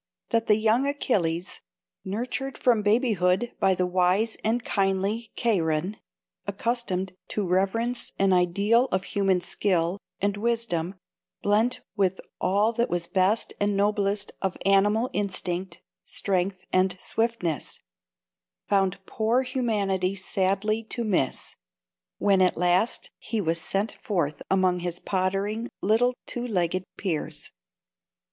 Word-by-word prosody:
that 230 -1 +1
the 210 - +6
young 225 +5 +2
Achilles, 185 - -1 0.4
nurtured 250 +7 -3
from 235 -4 +3
babyhood 210 -1 +2
by 190 -1 +3
the 180 - +1
wise 185 +5 +2
and 230 +2 +1
kindly 200 +3 0
Cheiron, 180 -4 0 0.5
accustomed 200 -3 -1
to 205 -3 -2
reverence 210 +7 0
an 195 -1 +3
ideal 200 +7 +3
of 190 -7 -1
human 195 -2 +1
skill 180 -1 0 0.2
and 200 0 0
wisdom 205 -6 -1 0.5
blent 225 +5 +2
with 190 -2 +1 0.2
all 205 +5 +2
that 235 +1 0
was 175 -1 -1
best 190 +5 +1
and 205 -1 +1
noblest 205 0 0
of 190 -2 -1
animal 205 +4 +4
instinct, 185 -3 -3 0.2
strength 185 -1 -1
and 185 0 +2
swiftness, 225 - -2 0.9
found 195 -2 +2
poor 230 +6 +1
humanity 205 -7 0
sadly 200 +3 0
to 235 +2 -4
miss, 185 - -1 0.6
when 195 -2 +3
at 185 - +3
last 180 +6 +2 0.2
the 225 - +1
was 165 -2 0
sent 195 +6 -1
forth 155 -8 -2
among 185 -2 +3
his 175 0 -4
pottering 195 +4 -1
little 240 +5 +3
two 245 0 -3
legged 185 -3 0
peers. 170 -7 -3
195 Hz, 120 wpm, -26 LUFS, 185-225 Hz, 0.9 s, the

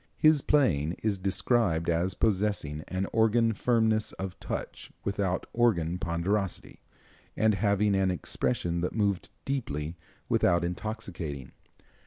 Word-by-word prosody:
His 155 -2 +5
playing 85 - +2
is 105 -3 0
described 95 -2 +1
as 85 +2 +1
possessing 100 -8 0
an 95 +1 -2
organ 115 +1 +3
firmness 110 -1 +1
of 95 -1 -6
touch - - -5
without 100 -2 -1
organ 90 -8 +2
ponderosity, 95 +2 -2 0.6
and 110 0 +4
having 100 0 +2
an 95 -1 +2
expression 85 -1 -1
that 90 - -2
moved 100 -4 0 0.2
deeply 80 - -3 0.3
without 85 0 +3
intoxicating. 85 - -5
95 Hz, 115 wpm, -29 LUFS, 85-110 Hz, 0.6 s, His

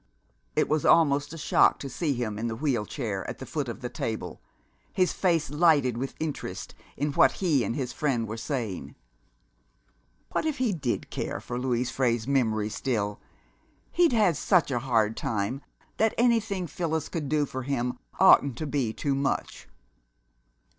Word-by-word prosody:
It - - +2
was 155 -1 +1
almost 145 -3 +4
a 165 - -7
shock - - +4
to 140 - -6
see 145 +2 -1
him 110 -4 -3
in 115 - -1
the 115 - -3
wheel 125 -5 -1
chair 110 -9 -3
at - - -6
the - - -8
foot - - -3
of - - -7
the - - -3
table, - - -4 0.5
his 185 -2 +1
face 165 -7 +1
lighted 150 -6 +3
with 130 +3 -4
interest 155 -2 -4 0.2
in 145 +1 0
what - - +5
he 155 -9 +1
and 115 - -2
his 130 -3 -3
friend 125 -7 0
were 110 - -4
saying. 115 - -4 1.4
What - - 0
if 305 -2 -1
he 250 -6 +1
did 135 -8 -3
care - - -3
for 120 0 -5
Louise 125 -1 0
Frey's 120 -3 0
memory 110 -6 +1
still! 105 -3 -2 0.7
He'd 345 -3 +4
had 210 -8 +3
such 180 -7 +2
a 120 - +1
hard 115 -4 +1
time 110 +5 -2 0.4
that 220 0 +2
anything 225 -6 +2
Phyllis 160 0 -2
could 155 -5 -4
do 150 0 +2
for 130 -1 -5
him 125 -2 -2 0.2
oughtn't 135 -4 +6
to 155 - -3
be 135 -6 -1
too 140 +3 -1
much! 135 - -2
135 Hz, 170 wpm, -27 LUFS, 120-160 Hz, 1.4 s, oughtn't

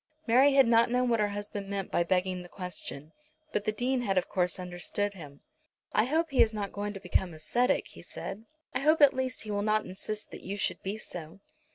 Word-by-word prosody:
Mary 260 +4 +5
had 270 -1 +7
not 230 0 +5
known 250 +1 +2
what 230 -1 +2
her 210 - +3
husband 205 -1 -5
meant 200 -1 -3
by - - +2
begging 185 +1 0
the 175 - -11
question, 165 -5 -6 0.4
but 210 - -1
the 215 - +2
Dean 250 +4 0
had 195 -5 0
of 180 - +2
course 180 0 0
understood 185 +3 -2
him. 145 -7 -11 0.5
"I 215 - +4
hope 320 +4 0
he 270 - +4
is 220 -1 +4
not 200 -2 -3
going 205 0 -3
to 195 - -7
become 185 -3 0
ascetic," 240 +11 +1
he - - -13
said. 215 +3 -7 0.3
"I 250 - 0
hope 310 +3 +3
at 285 -2 +8
least 260 -1 -2
that - - -6
he 215 - -5
will 205 0 0
not 215 +1 +1
insist 210 +3 -6
that - - -9
you 200 +2 -5
should - - 0
be 195 +3 -3
so." 175 -3 -7
205 Hz, 230 wpm, -30 LUFS, 185-240 Hz, 0.5 s, at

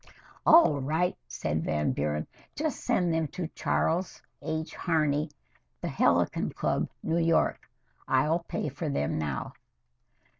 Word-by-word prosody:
"All 310 - +7
right," 160 +6 0
said 75 +6 -2
Van 75 -1 0
Buren. 75 +1 -1 0.3
"Just 305 0 -2
send 180 -9 +2
them 160 -1 +1
to 175 +3 -4
Charles 175 +2 -1 0.2
H. 160 +1 -3
Harney, 155 -3 +1 0.5
The - - -3
Helicon - - +2
Club, - - 0
New 165 +1 +1
York. 165 -1 +1 0.4
I'll 150 +6 +3
pay 170 - -4
for 145 +3 -4
them 80 - -1
now." 75 -4 -3
155 Hz, 125 wpm, -29 LUFS, 130-170 Hz, 0.5 s, All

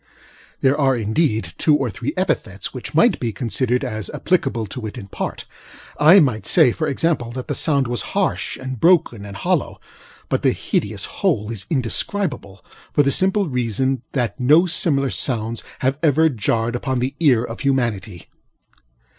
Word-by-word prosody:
There 135 +1 +3
are, 135 -1 +3
indeed, 110 - -1
two 150 - +4
or 135 -5 -1
three 125 +8 -4
epithets 100 - -2
which - - -7
might - - +4
be 115 - -2
considered 125 +2 -1
as 110 -5 -4
applicable 135 -10 -1
to 110 +2 -6
it 105 - -9
in - - -7
part; - - -5 0.5
I 160 +7 +8
might 110 - +1
say, 155 -8 +5
for 155 +5 -2
example, 140 -4 -1
that 130 0 -6
the - - -2
sound 140 -4 +1
was 120 0 -2 0.2
harsh, - - -1
and 130 -2 -6
broken 165 - +2
and 100 -1 -8
hollow; - - -1 0.5
but - - -1
the - - +2
hideous - - -2
whole 105 +2 -1
is 100 -3 -5
indescribable, 130 - -2 0.3
for 145 - +3
the 140 - +2
simple 190 +4 +2
reason 125 0 -1
that 120 -4 -2
no 150 +8 +5
similar 140 -6 +2
sounds 115 -3 -1 0.2
have 135 +2 0
ever 160 0 +4
jarred 115 -1 -1
upon 130 +1 -2
the 130 +3 -1
ear 130 -8 +4
of 115 -1 -7
humanity. 115 - -1
130 Hz, 165 wpm, -20 LUFS, 115-145 Hz, 0.5 s, I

